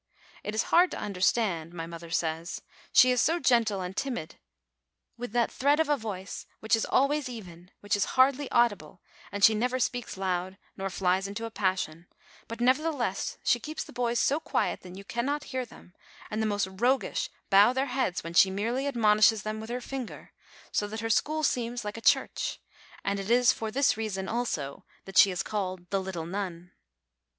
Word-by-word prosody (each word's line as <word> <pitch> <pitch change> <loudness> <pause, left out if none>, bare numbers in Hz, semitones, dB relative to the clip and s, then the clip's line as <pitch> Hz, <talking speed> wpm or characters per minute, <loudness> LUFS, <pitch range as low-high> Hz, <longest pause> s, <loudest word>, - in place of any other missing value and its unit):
It 210 - -4
is 220 - +2
hard 355 +2 +6
to - - -6
understand, 185 -4 0
my 165 -1 -4
mother 170 0 -9
says; 165 +1 -2 0.3
she 255 - +7
is 250 - +3
so 330 +2 +2
gentle 230 - +2
and 180 +1 -5
timid, 245 - -4 0.8
with 245 -1 -6
that 240 -1 +2
thread 285 +3 +2
of 320 -2 +2
a 295 - +4
voice, 200 -6 -6
which 220 +1 +2
is 225 - -1
always 280 0 +2
even, 180 -7 -10
which 205 0 0
is 200 - +1
hardly 270 +2 +4
audible, 205 -8 +1 0.3
and 200 0 -4
she 220 - +8
never 250 +4 0
speaks 245 -4 -2
loud 185 0 -2 0.2
nor 195 0 -3
flies 190 +1 0
into 205 +3 -5
a 225 - -6
passion; 185 -5 -2 0.4
but, 230 - -7
nevertheless, 255 -4 0
she 240 - +3
keeps 310 +5 -5
the - - -13
boys 240 -1 0
so 285 +3 +2
quiet - - -1
that 180 0 -11
you 195 - -9
cannot 270 +8 -2
hear 255 -1 -1
them, 180 - -16 0.4
and 215 +1 -1
the 220 - +1
most 205 -1 0
roguish 240 +8 0 0.2
bow 200 +4 +7
their 265 +2 0
heads 260 -9 -1
when 165 +1 -6
she 190 +2 +6
merely 230 +8 -1
ad 280 - -3
monishes 215 -1 +4
them 215 0 -3
with 220 +1 -8
her 245 +1 -3
finger, 260 -1 -7 0.4
so 205 - 0
that 220 +1 -5
her 225 0 -1
school 310 +7 +1
seems 240 -4 -1
like 210 - -4
a 230 - -7
church; - - +1 0.5
and 200 0 0
it 195 +1 -5
is 240 -1 +5
for 220 - -4
this 270 +5 +2
reason, 195 -4 -3
also, 160 - -3 0.2
that 195 - -10
she 195 - +8
is 185 0 -2
called 185 -4 -4
"the 195 -1 +1
little 185 -4 -5
nun." 180 -1 -5
215 Hz, 195 wpm, -28 LUFS, 190-245 Hz, 0.8 s, she